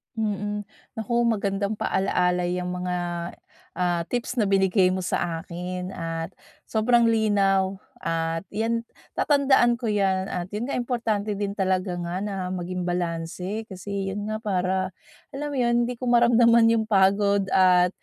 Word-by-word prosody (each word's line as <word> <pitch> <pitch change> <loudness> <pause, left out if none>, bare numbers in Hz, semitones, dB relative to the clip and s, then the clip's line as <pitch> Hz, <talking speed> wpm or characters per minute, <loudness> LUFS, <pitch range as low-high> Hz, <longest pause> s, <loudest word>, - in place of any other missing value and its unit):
Mm. 210 -1 -2 0.3
Naku, 225 +1 -4
magandang 200 -1 0
paalaala 180 -3 +1
yang 180 0 -2
mga 180 0 -2 0.8
ah, 175 -1 +1
tips 245 +1 -2
na 210 - +2
binigay 190 -1 +3
mo 185 0 -2
sa 165 -2 -1
akin 180 +2 -5
at 165 -1 -4 0.3
sobrang 235 +2 +3
linaw. 195 -3 +2 0.2
At 165 +1 -2
yan, 230 +2 -1 0.3
tatandaan 270 -4 +4
ko 235 -1 -3
yan, 195 -2 +1
at 180 +2 -4
yun 230 +5 -3
nga, - - -1
importante 225 -4 -1
din 200 0 -3
talaga 185 -1 0
nga 175 +2 -3
na 205 0 -3 0.2
maging 180 0 -4
balanse 175 +4 -3
kasi 195 -1 -4
yun 205 +1 -4
nga, 215 - -2
para 190 -3 -1 0.4
alam 295 +2 -4
mo 285 - -4
'yon, 240 -1 +2
hindi 245 0 -4
ko 255 - -5
maramdaman 235 -1 +5
yung 225 -1 +2
pagod, 200 -1 +3
at 180 -1 +5
195 Hz, 145 wpm, -25 LUFS, 180-225 Hz, 0.8 s, maramdaman